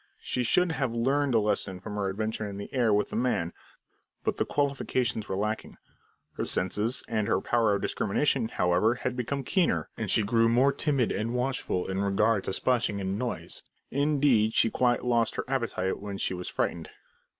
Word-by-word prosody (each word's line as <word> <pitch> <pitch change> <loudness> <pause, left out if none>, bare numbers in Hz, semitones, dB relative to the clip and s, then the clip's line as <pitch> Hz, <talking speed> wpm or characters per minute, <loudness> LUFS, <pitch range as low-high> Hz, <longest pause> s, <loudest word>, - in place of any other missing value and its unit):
She 125 - -1
should 175 +8 +3
have 135 -6 -1
learned 135 +2 +1
a - - +6
lesson 100 -3 -1
from 100 - -7
her 100 -2 -1
adventure 110 +2 -3
in 100 - -7
the 100 - -8
air 120 -4 +2
with 105 0 +1
the - - -4
man, 115 -8 0 0.7
but - - -1
the - - 0
qualifications 130 -6 -1
were 95 - -1
lacking. 105 +2 -3 0.6
Her - - -1
senses, 105 +7 0
and 110 -3 -1
her - - +2
power 115 -1 +2
of 100 - -3
discrimination, 120 +3 +1
however, 90 +5 +2
had 125 0 -3
become 135 +3 -2
keener, 125 - +1
and - - -4
she 110 - +4
grew 115 +2 +3
more 130 +4 +4
timid 140 -4 +1
and 115 +3 -2
watchful 125 -7 -1
in 95 +1 -2
regard 100 +1 +2
to - - -2
splashing 115 -3 +1
and 95 +1 -2
noise; 125 -1 -3 0.3
indeed, 140 -6 +2
she 115 - +4
quite 125 -1 +1
lost 120 -2 +2
her - - -3
appetite 120 -8 -1
when 100 -1 -6
she 95 - -1
was 90 0 -4
frightened. - - -2
115 Hz, 185 wpm, -28 LUFS, 100-130 Hz, 0.7 s, a